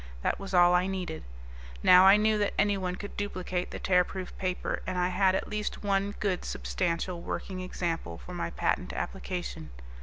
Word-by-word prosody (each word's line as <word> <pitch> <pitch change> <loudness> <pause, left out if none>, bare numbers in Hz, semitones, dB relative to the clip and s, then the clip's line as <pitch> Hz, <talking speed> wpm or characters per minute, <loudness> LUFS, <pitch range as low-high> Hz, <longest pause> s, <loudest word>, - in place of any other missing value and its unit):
That - - 0
was 195 - -7
all 175 -1 +6
I 180 +1 +3
needed. 185 -4 -4 0.6
Now 180 +1 +8
I 195 +2 +8
knew 215 0 +2
that 205 - 0
anyone 195 -3 +1
could 205 +2 -8
duplicate 185 -3 -3
the - - -6
Tearproof 180 0 0
Paper, 185 -1 -2
and 185 -1 -2
I 180 0 +2
had 185 +1 +3
at - - -2
least 210 0 -3
one, 200 0 0
good, 195 -4 -1
substantial 165 - -2
working 185 +1 -4
example 170 - -3
for - - -10
my - - -2
patent - - -1
application. - - -4
185 Hz, 175 wpm, -29 LUFS, 180-195 Hz, 0.6 s, Now